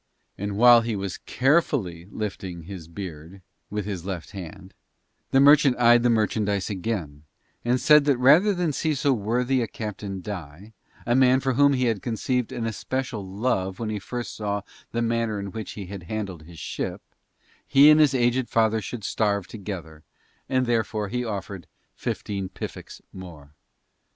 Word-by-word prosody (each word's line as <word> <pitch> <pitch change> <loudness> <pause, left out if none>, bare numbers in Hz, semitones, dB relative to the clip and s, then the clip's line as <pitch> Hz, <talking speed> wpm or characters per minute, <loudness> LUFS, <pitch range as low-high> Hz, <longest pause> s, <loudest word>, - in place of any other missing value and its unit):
And 100 0 -4
while 120 +1 +8
he 115 -1 -2
was 95 -1 -4
carefully 125 - 0
lifting 95 -5 -5
he 90 -2 -9
beard 85 0 -9 0.3
with 105 -1 -3
his 95 -5 -4
left 95 -4 -5
hand, 95 0 -9 0.6
the 135 - +4
merchant 140 -2 +6
eyed 120 0 +6
the 120 - +3
merchandise 105 -3 0
again, 90 -7 -4 0.4
and 125 +2 +1
said 150 +1 +6
that 140 -3 +3
rather 150 +11 +6
than 175 -5 -1
see 155 +2 0
so 140 0 +2
worthy 125 +4 0
a 115 - -1
captain 105 -3 -6
die, 95 +1 -8 0.3
a 120 - +1
man 130 0 +5
for 135 -1 0
whom 140 +2 +4
he 130 -1 +1
had 110 -5 0
conceived 125 +1 -1
an 115 - -3
especial 115 0 -3
love 95 -1 -2
when 110 -2 -3
first 120 +4 -5
he - - -10
saw 105 -1 -2 0.3
the 120 0 -1
manner 115 -2 0
in 100 -1 -5
which 110 +1 -6
he 100 - -7
handled 95 -2 -6
his 85 -1 -13
ship, - - -5 0.6
he 145 +2 +7
and 155 - +6
his 145 -3 +4
aged 120 0 +1
father 110 -1 +2
should 115 0 -6
starve 100 -1 0
together 90 -7 -8 0.5
and 130 -1 +2
therefore 110 -3 -1
he 125 +2 -2
offered 100 -5 -5 0.3
fifteen 100 -2 -4
piffeks - - -8
more. 80 -6 -11
110 Hz, 165 wpm, -25 LUFS, 95-125 Hz, 0.6 s, while